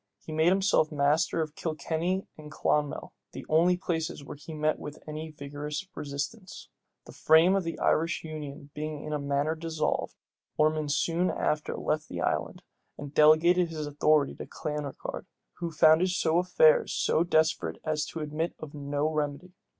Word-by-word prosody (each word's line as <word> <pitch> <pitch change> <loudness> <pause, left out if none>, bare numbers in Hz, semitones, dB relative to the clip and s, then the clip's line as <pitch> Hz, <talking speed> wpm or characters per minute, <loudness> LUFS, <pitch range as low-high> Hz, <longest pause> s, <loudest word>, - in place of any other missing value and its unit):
He - - -7
made 160 +1 +2
himself 190 -4 +2
master 150 +3 +2
of 155 -1 -8
Kilkenny 165 +4 -2
and 150 -1 -11
Clonmel, 150 -1 -1 0.2
the - - -8
only 170 +3 +4
places 160 -5 -3
where 140 - -8
he 145 +3 -11
met 155 0 0
with 150 +1 -8
any 155 +1 -5
vigorous 150 +3 -6
resistance. 150 +8 -6 0.4
The - - -11
whole - - -16
frame 165 +4 +6
of 195 - +1
the 165 0 -4
Irish 165 +1 +1
union 145 -3 -8
being 150 -1 -5
in 155 - -4
a 150 - -1
manner 140 +2 0
dissolved, 160 -1 -2 0.4
Ormond 155 -1 +2
soon 170 +5 +1
after 150 0 -1
left 155 0 -2
the - - -5
island, - - -2 0.3
and 145 -1 -8
delegated 165 +4 +5
his 155 -2 -4
authority 145 0 +2
to - - -8
Clanricarde, 150 -2 -5 0.3
who 170 -1 -2
found 160 +1 +5
affairs 185 - +3
so 160 - +2
desperate 155 - +1
as 155 -1 -1
to 165 - -6
admit 155 +3 -3
of 155 -2 -9
no 145 0 -2
remedy. 150 +4 -3
155 Hz, 160 wpm, -28 LUFS, 150-165 Hz, 0.4 s, frame